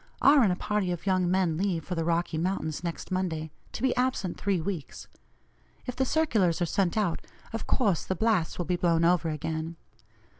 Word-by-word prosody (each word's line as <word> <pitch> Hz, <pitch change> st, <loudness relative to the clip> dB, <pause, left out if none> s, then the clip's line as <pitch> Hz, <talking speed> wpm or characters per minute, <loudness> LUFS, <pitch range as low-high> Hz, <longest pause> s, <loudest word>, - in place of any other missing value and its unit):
R. 280 Hz, 0 st, +7 dB
and 210 Hz, -6 st, +4 dB
a -, -, +1 dB
party 205 Hz, -1 st, -1 dB
of 175 Hz, +1 st, -4 dB
young 185 Hz, -2 st, +2 dB
men 180 Hz, -4 st, +2 dB
leave 180 Hz, -3 st, 0 dB
for 185 Hz, -, -3 dB
the 165 Hz, -2 st, -1 dB
Rocky 170 Hz, -1 st, 0 dB
Mountains 170 Hz, -3 st, -2 dB
next 170 Hz, +1 st, -5 dB
Monday, 165 Hz, -4 st, -2 dB, 0.2 s
to -, -, -6 dB
be 260 Hz, -, +2 dB
absent 250 Hz, -8 st, 0 dB
three 195 Hz, -3 st, 0 dB
weeks. 165 Hz, -3 st, -5 dB, 0.8 s
If 250 Hz, -, -4 dB
the 265 Hz, -, +1 dB
circulars 220 Hz, -, +2 dB
are 175 Hz, -, +2 dB
sent 185 Hz, +2 st, 0 dB
out, 200 Hz, -6 st, 0 dB, 0.3 s
of 225 Hz, -, -4 dB
course 205 Hz, -, +2 dB
the 190 Hz, -, -2 dB
blasts 210 Hz, -4 st, +1 dB
will 175 Hz, -, -2 dB
be 180 Hz, +1 st, 0 dB
blown 170 Hz, -1 st, +2 dB
over 170 Hz, -1 st, +3 dB
again. 160 Hz, +2 st, -3 dB
180 Hz, 195 wpm, -28 LUFS, 165-205 Hz, 0.8 s, R